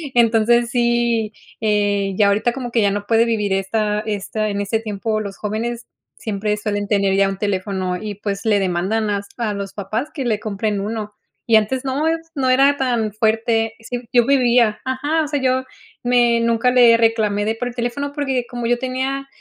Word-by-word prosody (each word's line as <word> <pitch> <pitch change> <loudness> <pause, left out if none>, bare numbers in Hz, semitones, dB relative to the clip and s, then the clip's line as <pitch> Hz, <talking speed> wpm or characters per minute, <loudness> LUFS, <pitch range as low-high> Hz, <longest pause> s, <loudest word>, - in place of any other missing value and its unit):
Entonces 235 0 +3
sí, 235 -2 +1 0.3
eh, 205 -2 +1
ya 210 - +4
ahorita 220 +4 +1
como 245 -2 -5
que 230 - +1
ya 200 - +3
no 205 0 -3
puede 225 +1 +3
vivir 210 -4 -1
esta 210 +2 0
esta, 215 0 -3
en 200 0 -2
este 210 +2 -1
tiempo 215 0 -2
los 200 -2 -7
jóvenes 230 +3 -4 0.3
siempre 210 -1 -2
suelen 205 -1 -2
tener 200 -2 +2
ya 195 0 +4
un 195 - -4
teléfono 190 -2 -2
y 210 -2 -5
pues 200 0 -4
le 210 -2 +3
demandan 195 +4 0
hasta 205 +3 -3
a 210 - -2
los 200 -1 -5
papás 215 +7 -3
que 275 -5 -3
le 220 -3 0
compren 210 -1 -2
uno, 210 0 -4 0.3
y 230 - +5
antes 250 +5 0
no 275 +4 0
es 325 0 -2
no 265 -2 +1
era 275 +2 +4
tan 240 -5 0
fuerte. 225 0 +1
Sí, 245 +2 -5
yo 240 -1 +5
vivía 240 -5 +3
ajá, 290 +5 0
o - - -5
sea, 290 -2 -2
yo 260 0 +1 0.4
me 240 -1 +3
nunca 230 +1 +2
le 240 -2 +6
reclamé 220 -3 +1
de 220 - 0
por 245 +2 -3
el 240 - -11
teléfono 255 +4 -3
porque 265 -4 -1
como 240 -2 -3
yo 245 +1 +2
tenía, 265 +1 -3
225 Hz, 195 wpm, -20 LUFS, 205-245 Hz, 0.4 s, le